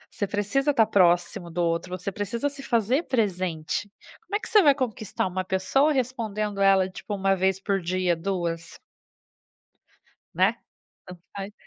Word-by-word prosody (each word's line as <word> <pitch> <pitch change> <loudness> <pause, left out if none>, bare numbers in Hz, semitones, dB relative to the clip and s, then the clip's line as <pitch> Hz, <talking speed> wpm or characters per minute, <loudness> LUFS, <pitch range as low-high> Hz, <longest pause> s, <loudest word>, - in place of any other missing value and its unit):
você 205 - -1
precisa 210 +8 0
tá 225 - +5
próximo 175 -3 +2
do 175 +1 -1
outro, 170 +2 -1
você 185 +2 -4
precisa 220 +7 -2
se 280 -1 -5
fazer 245 +3 +1
presente. 185 - -1 0.3
Como 410 - -6
é 415 - +1
que - - -8
você 430 -2 +6
vai 290 -6 +5
conquistar 230 -6 -2
uma 185 0 -2
pessoa 190 +11 +2
respondendo 220 -6 -2
ela, 195 -1 +5
tipo, 205 +2 -6
1 195 0 +2
vez 190 0 +1
por 195 -1 -1
dia, 180 0 0
2? 170 -2 -3 1.6
Né? - - +2 0.5
Tanto 180 -2 -11 0.2
faz. 200 +1 -6
195 Hz, 155 wpm, -25 LUFS, 180-230 Hz, 1.6 s, você